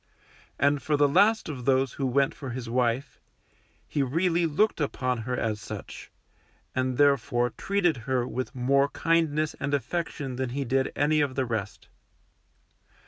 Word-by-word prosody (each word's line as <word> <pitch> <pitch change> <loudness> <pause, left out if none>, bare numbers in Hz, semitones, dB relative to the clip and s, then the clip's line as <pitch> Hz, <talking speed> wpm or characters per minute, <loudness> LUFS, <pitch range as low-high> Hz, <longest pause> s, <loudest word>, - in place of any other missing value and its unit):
And 140 0 +2
for 150 -1 0
the 145 0 +5
last 205 +9 +3
of 130 -6 -6
those 135 -1 +2
who 135 - -2
went 135 +2 +2
for 135 - -7
his 120 0 -5
wife, 125 +3 -1 0.7
he 145 - -1
really 165 +5 +1
looked 165 +4 +1
upon 130 -3 -1
her 125 - -1
as 110 -2 -2
such, - - -8 0.6
and 130 -1 -1
therefore 125 -4 +3
treated 180 - 0
her 125 -2 +1
with 130 +1 -4
more 140 +3 +2
kindness 155 -2 +1
and 140 +1 0
affection 140 -1 -3
than 130 -1 -2
he 140 - -1
did 130 +2 0
any 150 +1 +2
of 140 -3 -1
the 130 - 0
rest. 110 -4 -4
140 Hz, 155 wpm, -27 LUFS, 125-150 Hz, 0.7 s, the